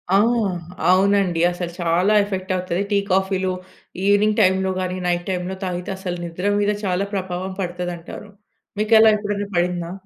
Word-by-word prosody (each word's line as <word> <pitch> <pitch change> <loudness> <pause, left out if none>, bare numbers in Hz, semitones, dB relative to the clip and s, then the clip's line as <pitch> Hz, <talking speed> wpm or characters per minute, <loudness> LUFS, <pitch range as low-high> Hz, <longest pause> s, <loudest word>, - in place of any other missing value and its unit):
ఆ! - - +7 0.7
అవునండి. 190 -2 +3
అసలు 175 -1 -5
చాలా 175 +5 +2
ఎఫెక్ట్ 190 -2 -4
అవుతది. 180 0 -2
టీ 205 - +3
కాఫీలు 190 0 +1 0.5
ఈవినింగ్ 205 +1 +3
టైమ్‌లో 190 -1 +3
గాని 185 0 -2
నైట్ 175 0 0
టైమ్‌లో 185 0 -2
తాగితే 180 0 -3
అసలు 180 -2 -4
నిద్ర 180 +4 -2
మీద 205 0 +2
చాలా 185 +1 0
ప్రభావం 185 -1 -3
పడతదంటారు. 175 +2 -6 0.5
మీకు 215 +1 +3
అలా 220 0 +7
ఎప్పుడైనా 205 -1 -3
పడిందా? 175 -1 -1
185 Hz, 145 wpm, -21 LUFS, 175-200 Hz, 0.7 s, ఆ